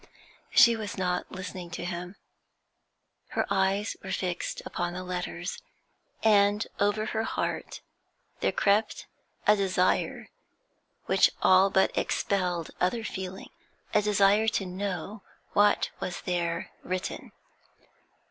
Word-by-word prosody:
She 235 Hz, -3 st, +7 dB
was 215 Hz, -2 st, -5 dB
not 180 Hz, -1 st, -1 dB
listening 185 Hz, -1 st, -7 dB
to -, -, -5 dB
him. 175 Hz, +1 st, -5 dB, 1.1 s
Her -, -, -1 dB
eyes 195 Hz, +2 st, +1 dB
were 190 Hz, -, -5 dB
fixed 180 Hz, -2 st, -2 dB
upon 175 Hz, 0 st, -3 dB
the 185 Hz, +1 st, -5 dB
letters, 180 Hz, 0 st, -4 dB, 0.6 s
and 205 Hz, -1 st, +4 dB
over 205 Hz, +1 st, +2 dB
her 220 Hz, -, -1 dB
heart 225 Hz, -, -3 dB, 0.6 s
there -, -, +1 dB
crept 210 Hz, +2 st, +1 dB, 0.4 s
a 210 Hz, -, +6 dB
desire 185 Hz, -2 st, 0 dB, 0.8 s
which -, -, +5 dB
all 190 Hz, +1 st, +6 dB
but 190 Hz, -1 st, +2 dB
expelled 180 Hz, -4 st, -1 dB
other 205 Hz, +6 st, +1 dB
feeling, 190 Hz, -2 st, -6 dB, 0.4 s
a 210 Hz, -, +5 dB
desire 205 Hz, +1 st, +4 dB
to 220 Hz, -3 st, +1 dB
know 195 Hz, +2 st, -4 dB, 0.3 s
what 205 Hz, 0 st, +3 dB
was 180 Hz, -, -4 dB
there 170 Hz, -2 st, -2 dB
written. 185 Hz, 0 st, -4 dB
190 Hz, 115 wpm, -28 LUFS, 180-205 Hz, 1.1 s, She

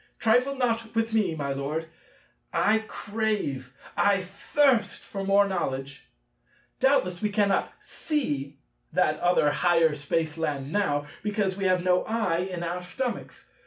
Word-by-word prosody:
Trifle 250 Hz, +5 st, +3 dB
not 230 Hz, -3 st, -1 dB
with 225 Hz, 0 st, 0 dB
me, 210 Hz, -7 st, +2 dB
my 140 Hz, -3 st, -2 dB
Lord; 150 Hz, +4 st, -3 dB, 0.6 s
I 220 Hz, +1 st, +3 dB
crave, 205 Hz, -, -2 dB, 0.2 s
I 205 Hz, -1 st, +4 dB
thirst, 235 Hz, +7 st, +1 dB
for 195 Hz, -1 st, -5 dB
more 200 Hz, +1 st, +4 dB
knowledge. 135 Hz, -7 st, -3 dB, 0.7 s
Doubtless 255 Hz, -10 st, +2 dB
we 210 Hz, -, +1 dB
cannot 200 Hz, -1 st, +1 dB
see 145 Hz, -, -3 dB, 0.4 s
that 155 Hz, -3 st, +2 dB
other 175 Hz, -4 st, +3 dB
higher 165 Hz, -1 st, +3 dB
Spaceland 150 Hz, -1 st, -2 dB
now, 145 Hz, -8 st, +1 dB, 0.2 s
because 205 Hz, -2 st, -1 dB
we 195 Hz, 0 st, -3 dB
have 185 Hz, -1 st, +2 dB
no 180 Hz, 0 st, +3 dB
eye 215 Hz, -7 st, 0 dB
in 175 Hz, -1 st, -4 dB
our 175 Hz, +1 st, -3 dB
stomachs. 240 Hz, +8 st, -5 dB
185 Hz, 130 wpm, -27 LUFS, 155-220 Hz, 0.7 s, I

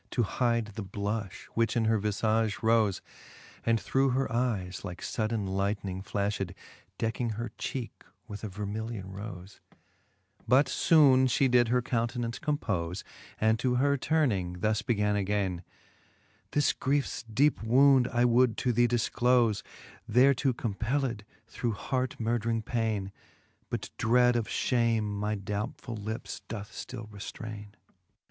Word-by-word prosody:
To 120 Hz, -, +1 dB
hide 115 Hz, +1 st, +1 dB
the 110 Hz, -, -5 dB
blulh;, 100 Hz, +2 st, -3 dB, 0.2 s
which 115 Hz, +1 st, +1 dB
in 115 Hz, -, +2 dB
her 110 Hz, 0 st, +3 dB
vifage 110 Hz, +1 st, +1 dB
rofe, 110 Hz, -3 st, +3 dB, 0.6 s
And 115 Hz, -1 st, +2 dB
through 135 Hz, +4 st, +1 dB
her 130 Hz, +2 st, 0 dB
eyes 110 Hz, -7 st, -1 dB
like 90 Hz, -3 st, -6 dB
fudden 110 Hz, -1 st, -2 dB
lightning 95 Hz, 0 st, -2 dB
flaftied. 100 Hz, -1 st, -2 dB, 0.4 s
Decking 115 Hz, 0 st, -1 dB
her 115 Hz, +1 st, -5 dB
cheeke 125 Hz, -4 st, -5 dB, 0.2 s
with 105 Hz, 0 st, -8 dB
a -, -, -2 dB
vermilion 105 Hz, 0 st, -5 dB
rofe; 95 Hz, -1 st, -8 dB, 0.9 s
But 130 Hz, +4 st, +4 dB
{bone 135 Hz, -5 st, +7 dB
flie 130 Hz, +2 st, +2 dB
did 125 Hz, -2 st, +4 dB
her 125 Hz, +1 st, +2 dB
countenance 120 Hz, 0 st, -2 dB
compole, 100 Hz, -, -1 dB, 0.4 s
And 110 Hz, +1 st, +3 dB
to 125 Hz, -1 st, +1 dB
her 140 Hz, +3 st, +3 dB
turning, 105 Hz, -, 0 dB
thus 110 Hz, +1 st, +1 dB
began 105 Hz, -2 st, +1 dB
againe 100 Hz, -2 st, 0 dB
j 85 Hz, -, -12 dB, 0.9 s
This 145 Hz, 0 st, +3 dB
griefes 140 Hz, -1 st, -1 dB
deepe 140 Hz, +7 st, +3 dB
wound 130 Hz, +3 st, +5 dB
I 120 Hz, +1 st, +3 dB
would 120 Hz, -1 st, +4 dB
to 125 Hz, -, +1 dB
thee 120 Hz, +1 st, +4 dB
difclofe, 120 Hz, -2 st, +2 dB, 0.5 s
Thereto 130 Hz, +3 st, +4 dB
compelled 115 Hz, +1 st, -2 dB, 0.2 s
through 115 Hz, +1 st, -3 dB
hart 130 Hz, +4 st, -2 dB
murdring 115 Hz, 0 st, 0 dB
paine, 110 Hz, -4 st, -1 dB, 0.6 s
But -, -, -4 dB
dread 125 Hz, +2 st, +4 dB
of 115 Hz, -2 st, 0 dB
fliame 115 Hz, -3 st, +1 dB
my 105 Hz, +1 st, -2 dB
doubtfuU 105 Hz, +2 st, -5 dB
lips 110 Hz, +4 st, -5 dB
doth 105 Hz, -3 st, -6 dB
ftill 115 Hz, -4 st, -7 dB
reftraine. 105 Hz, 0 st, -8 dB
115 Hz, 135 wpm, -29 LUFS, 105-125 Hz, 0.9 s, bone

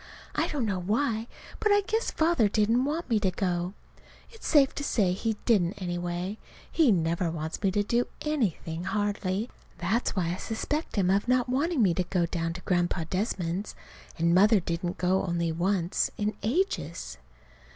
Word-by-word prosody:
I -, -, +1 dB
don't 280 Hz, -6 st, -1 dB
know 195 Hz, -4 st, -1 dB
why, 220 Hz, +4 st, 0 dB, 0.3 s
but 425 Hz, -, +2 dB
I 410 Hz, 0 st, +5 dB
guess 445 Hz, +3 st, -1 dB
Father 315 Hz, -10 st, +2 dB
didn't 225 Hz, +5 st, +2 dB
want 315 Hz, +4 st, -2 dB
me 225 Hz, -3 st, +2 dB
to 200 Hz, -2 st, +2 dB
go. 180 Hz, -1 st, -1 dB, 0.6 s
It's 450 Hz, -, -9 dB
safe 280 Hz, -4 st, +5 dB
to 285 Hz, -, -4 dB
say 205 Hz, -9 st, +2 dB
he 220 Hz, +3 st, -2 dB
didn't, 195 Hz, -6 st, +3 dB
anyway. 175 Hz, +2 st, -3 dB, 0.3 s
He 310 Hz, -8 st, +4 dB
never 170 Hz, -1 st, +1 dB
wants 160 Hz, -1 st, -4 dB
me 195 Hz, -, +3 dB
to 205 Hz, +2 st, +1 dB
do 235 Hz, +4 st, +1 dB
anything, 185 Hz, -, -1 dB
hardly. 205 Hz, +1 st, -1 dB, 0.3 s
That's 205 Hz, +8 st, 0 dB
why 175 Hz, -3 st, 0 dB
I -, -, -4 dB
suspect 295 Hz, +8 st, -3 dB
him 190 Hz, -3 st, +2 dB
of 200 Hz, +4 st, +1 dB
not 250 Hz, 0 st, +2 dB
wanting 280 Hz, +1 st, +2 dB
me 185 Hz, -4 st, +4 dB
to 185 Hz, -, 0 dB
go 175 Hz, -1 st, 0 dB
down 165 Hz, -1 st, -2 dB
to 180 Hz, -, -8 dB
Grandpa 175 Hz, -1 st, 0 dB
Desmond's. 185 Hz, -1 st, -2 dB, 0.4 s
And 170 Hz, +1 st, +2 dB
Mother 205 Hz, +4 st, +6 dB
didn't 175 Hz, 0 st, -3 dB
go 185 Hz, +1 st, +2 dB
only 170 Hz, -2 st, 0 dB
once, 175 Hz, +1 st, 0 dB
in 210 Hz, +1 st, -1 dB
ages. 215 Hz, -, -2 dB
195 Hz, 170 wpm, -28 LUFS, 175-235 Hz, 0.6 s, Mother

